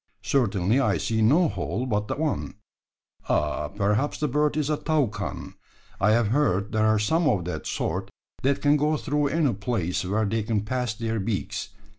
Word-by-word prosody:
Certainly 105 -1 +2
I 110 -8 +2
see 110 +8 -1
no 150 +11 +5
hole 115 - -3
but 105 -4 -1
the - - -2
one. 155 -7 -2 0.7
Oh! 75 0 0
perhaps 105 +7 0
the 150 - +1
bird 150 +2 +1
is 155 0 0
a 150 - +1
toucan. 150 -9 -2 0.5
I 100 - +3
have 110 -1 +3
heard 105 -7 +1
there 110 -1 +2
are 110 0 +4
some 160 +10 +2
of 90 -9 0
that 90 -3 -4
sort - - -2 0.3
that 135 +1 +1
can 145 +1 +5
go 150 +1 +1
through 145 0 0
any 145 -2 +1
place 100 -4 -2
where 105 +4 0
they 110 +2 0
can 105 0 0
pass 125 -1 -2
their 115 0 -2
beaks. 95 -5 -3
115 Hz, 180 wpm, -25 LUFS, 100-145 Hz, 0.7 s, no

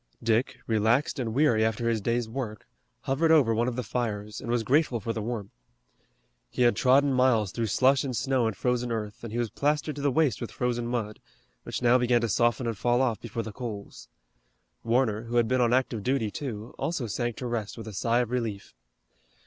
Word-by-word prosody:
Dick, 115 +2 +1
relaxed 115 +7 +1
and 115 -3 -2
weary 120 -3 +3
after 110 +1 0
his 115 -2 +1
day's 115 +2 0
work, 110 -3 -5 0.4
hovered 145 +5 +1
over 145 -8 +5
one 115 +2 +1
of 125 - -2
the 125 - -2
fires 105 -3 -3
and 125 - -7
was 120 -1 +1
grateful 135 0 +2
for 115 +2 -3
the 110 - -3
warmth. 105 -3 -4 1.0
He 125 - 0
had 120 -3 +4
trodden 135 +4 +4
miles 125 -6 +3
through 115 +1 -2
slush 130 +5 +3
and 130 -4 -3
snow 130 -4 +1
and 105 -4 -3
frozen 125 -1 0
earth, 105 -1 -4
and 115 - -6
he 115 - -3
was 120 -2 -1
plastered 150 +1 0
to 145 - -6
the 140 - +2
waist 135 -4 +1
with 120 - -4
frozen 120 -1 -2
mud, 115 -3 -3 0.4
which - - -5
now 120 +1 +5
began 120 -1 +2
to 115 - -1
soften 120 +3 +2
and 115 -4 -3
fall 120 0 +2
off 125 -4 +1
before 115 0 -5
the 110 - -6
coals. 105 -4 -7 0.8
Warner, 115 -2 +1
who 120 +1 -5
had 120 -1 +3
been 130 +1 +2
on 120 -1 +3
active 125 -3 +1
duty, 120 -2 0
too, 115 -4 -6
also 155 -7 -2
sank 120 +2 -2
to 125 - -6
rest 115 -3 -3
with 110 -1 -8
a 110 - -7
sigh 115 +5 +1
of 120 -1 -3
relief. 115 -5 -3
120 Hz, 215 wpm, -27 LUFS, 110-125 Hz, 1.0 s, over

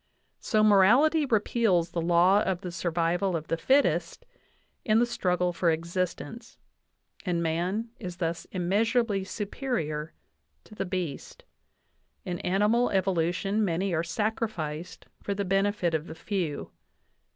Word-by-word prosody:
So 215 -1 +1
morality 245 +10 +5
repeals 205 -6 +2
the 170 - -2
law 175 +4 +4
of 190 -3 -1
the 180 - -5
survival 170 +2 0
of 160 -1 -5
the - - +1
fittest 170 - +1 0.6
in 215 0 +3
the 240 - +4
struggle 180 -6 0
for 170 0 +1
existence, 180 +8 -3 0.7
and 175 -3 -1
man 180 +8 -1
is 180 -1 -6
thus 165 -1 -2
immeasurably 205 +3 0
superior 190 - -3 0.5
to - - -16
the 195 -2 -3
beast. 180 -6 -5 0.8
In 175 -1 -3
animal 210 +6 +2
evolu 185 -4 +1
tion 200 +4 -1
many 185 0 0
are 160 - +1
sacrified 170 -3 -3 0.2
for 200 - -3
the 200 0 -2
benefit 195 -2 +1
of 160 +1 -1
the 160 - -8
few. 170 -3 -3
185 Hz, 130 wpm, -28 LUFS, 170-210 Hz, 0.8 s, morality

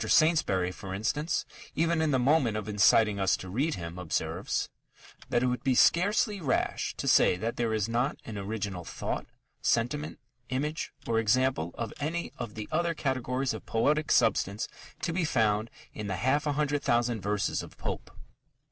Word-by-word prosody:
Saintsbury, 155 - +3
for 95 0 -6
instance, 150 - -1 0.3
even 165 +1 +2
in 160 - +2
the 135 - +3
moment 130 -4 +3
of 110 - -4
inciting 105 0 +4
us 95 -1 +3
to 95 - -8
read 140 - 0
him, 85 0 -6
observes 90 -3 -2 0.6
that 120 - +2
"it - - +3
would 125 -1 -1
be 130 -1 +2
scarcely 205 - +3
rash 135 -5 0
to - - -3
say 90 - +5
that 115 +5 -2
there 115 -2 0
is 110 -1 0
not 120 +5 0
an 110 - -6
original 100 -2 -4
thought, - - -4 0.3
sentiment, 145 +7 0 0.3
image, 150 +4 -2
or 115 -1 +1
example 115 -5 +2
of 115 -2 -4
any 165 +4 -3
of 110 - -5
the 110 -1 -5
other 170 +1 +1
categories 130 -2 -1
of 110 - -8
poetic 150 +7 +1
substance 105 -2 +2 0.4
to 170 - 0
be 175 0 0
found 110 -6 +1 0.2
in 105 -1 -5
the 95 - -1
half 135 - +1
a 145 - +1
hundred 145 0 0
thousand 120 -3 +1
verses 105 +1 0
of - - -11
Pope." - - -4
120 Hz, 175 wpm, -29 LUFS, 105-150 Hz, 0.6 s, say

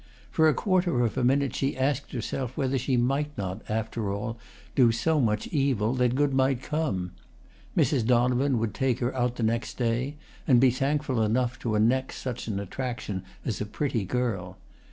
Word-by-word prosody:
For 160 -1 +4
a - - +3
quarter 180 - +2
of 110 - -2
a 130 - 0
minute 135 0 +2
she 135 0 -1
asked 140 +1 0
herself 130 +1 -4
whether 135 -2 +1
she 130 +1 0
might 140 +5 0
not, 95 +1 -4
after 110 -1 -2
all, 110 +3 -4 0.3
do 120 -4 +5
so 150 +8 +1
much 105 -3 +1
evil 130 -7 +1
that 125 -1 +2
good 145 0 +2
might 130 -1 +2
come. 135 - -1 0.7
Mrs. 135 -6 +3
Donovan 125 +2 +3
would 110 -3 -1
take 130 -3 +1
her 125 +1 -2
out 125 -1 0
the 120 - -3
next 115 +2 -1
day, 125 +4 0 0.3
and 125 -5 +6
be 130 0 +5
thankful 135 -1 0
enough 120 +3 +1
to 110 -3 -1
annex 125 +5 +2
such 125 -3 -5
an 100 -3 -2
attraction 105 -1 -4 0.2
as 110 - -2
a - - -1
pretty 120 -1 -1
girl. 95 -4 -2
125 Hz, 180 wpm, -27 LUFS, 115-135 Hz, 0.7 s, and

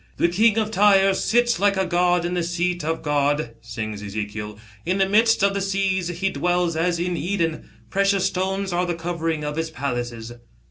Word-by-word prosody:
" - - -33
The 170 - +3
king 215 +5 +3
of 215 -1 0
Tyre 195 -1 +5
sits 240 +4 +1
like 200 0 +2
a 190 - +1
god 175 0 +2
in 175 - -2
the 180 - 0
seat 175 0 -1
of 160 +1 -2
God," 145 -3 0
sings 110 -3 -6
Ezekiel, 105 +1 -5 0.3
"'in 180 +3 0
the 195 -1 +2
midst 225 +1 +3
of 200 0 +3
the 200 - -2
seas. 195 -2 0
He 180 +3 -2
dwells 175 +2 0
as 170 +2 0
in 175 +1 -1
Eden. 170 -1 -2 0.2
Precious 195 -1 +2
stones 190 0 -1
are 180 +1 0
the 175 - -1
covering 165 -2 -3
of 150 +1 -4
his 160 0 -2
palaces." 120 -6 -4
175 Hz, 195 wpm, -23 LUFS, 155-195 Hz, 0.3 s, Tyre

